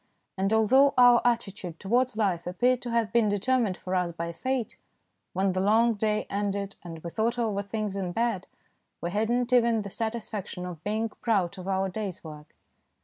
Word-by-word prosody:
And 195 Hz, +1 st, 0 dB
although 260 Hz, +6 st, +5 dB
our 245 Hz, -1 st, +7 dB
attitude 200 Hz, -8 st, -1 dB
towards 240 Hz, +3 st, +1 dB
life 180 Hz, -6 st, 0 dB
appeared 245 Hz, +8 st, +1 dB
to 245 Hz, -, -5 dB
have 230 Hz, -2 st, 0 dB
been 230 Hz, -3 st, +4 dB
determined 205 Hz, -1 st, +1 dB
for 185 Hz, -, -5 dB
us 180 Hz, -2 st, +1 dB
by 170 Hz, 0 st, -4 dB
Fate, 260 Hz, +6 st, -2 dB, 0.6 s
when 190 Hz, +1 st, +1 dB
the 185 Hz, -, -1 dB
long 225 Hz, +4 st, +4 dB
day 215 Hz, 0 st, 0 dB
ended 200 Hz, 0 st, -2 dB
and 165 Hz, -2 st, -9 dB
we 170 Hz, -, -5 dB
thought 230 Hz, +5 st, 0 dB
over 215 Hz, -4 st, 0 dB
things 205 Hz, 0 st, -3 dB
in 190 Hz, -3 st, -2 dB
bed, 225 Hz, -2 st, -1 dB, 0.5 s
we 170 Hz, -, -3 dB
had 215 Hz, +3 st, 0 dB
not 245 Hz, +1 st, 0 dB
even 235 Hz, -3 st, +4 dB
the 200 Hz, -, -7 dB
satisfaction 220 Hz, -5 st, -4 dB
of 175 Hz, -4 st, -8 dB
being 220 Hz, +2 st, -1 dB
proud 200 Hz, -5 st, -1 dB
of 185 Hz, -, -8 dB
our 195 Hz, 0 st, +1 dB
day's 195 Hz, -1 st, -5 dB
work. 150 Hz, -2 st, -11 dB
210 Hz, 185 wpm, -27 LUFS, 185-235 Hz, 0.6 s, our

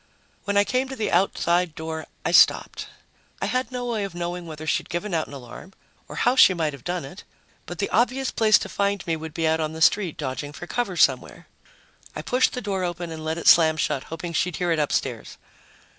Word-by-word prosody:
When 200 Hz, 0 st, 0 dB
I 200 Hz, -, +6 dB
came 255 Hz, +5 st, -1 dB
to 265 Hz, -, -5 dB
the 220 Hz, -4 st, -2 dB
outside 175 Hz, -3 st, +1 dB
door, 160 Hz, 0 st, -5 dB, 0.2 s
I -, -, +1 dB
stopped. -, -, +4 dB, 0.5 s
I -, -, -1 dB
had 255 Hz, +1 st, -1 dB
no 250 Hz, -1 st, -4 dB
way 230 Hz, -4 st, -2 dB
of 195 Hz, -3 st, -6 dB
knowing 175 Hz, 0 st, -4 dB
whether 155 Hz, -1 st, -8 dB
she'd -, -, -1 dB
given 175 Hz, +4 st, -3 dB
out 160 Hz, -2 st, 0 dB
an -, -, -12 dB
alarm, 140 Hz, +8 st, -11 dB, 0.3 s
or -, -, -9 dB
how 245 Hz, +1 st, +2 dB
she 190 Hz, -7 st, +7 dB
might 160 Hz, -3 st, -1 dB
have 140 Hz, -, -11 dB
done 175 Hz, -3 st, -3 dB
it, 175 Hz, +8 st, -11 dB, 0.4 s
but 175 Hz, -, -7 dB
the 200 Hz, -, -1 dB
obvious 255 Hz, +3 st, +1 dB
place 215 Hz, -1 st, +4 dB
to -, -, -5 dB
find 200 Hz, -2 st, -1 dB
me 165 Hz, -2 st, 0 dB
would 160 Hz, -1 st, -8 dB
be 165 Hz, -1 st, 0 dB
out 160 Hz, 0 st, +1 dB
on 155 Hz, 0 st, -2 dB
the 160 Hz, -, -7 dB
street, 180 Hz, 0 st, +3 dB
dodging 145 Hz, +1 st, -5 dB
for 175 Hz, -, -8 dB
cover 195 Hz, -2 st, -3 dB
somewhere. -, -, +1 dB, 0.7 s
I -, -, -5 dB
pushed 250 Hz, +1 st, +2 dB
the 250 Hz, -, -4 dB
door 195 Hz, -3 st, -2 dB
open 175 Hz, -1 st, -4 dB
and 160 Hz, -1 st, -7 dB
let 160 Hz, +1 st, -2 dB
it 170 Hz, -, -4 dB
slam 160 Hz, -2 st, +6 dB
shut, 135 Hz, -3 st, -1 dB
hoping 170 Hz, +1 st, -6 dB
she'd 180 Hz, +2 st, 0 dB
hear 175 Hz, -1 st, -1 dB
it 165 Hz, -, +1 dB
upstairs. 130 Hz, -5 st, -2 dB
175 Hz, 225 wpm, -24 LUFS, 160-200 Hz, 0.7 s, she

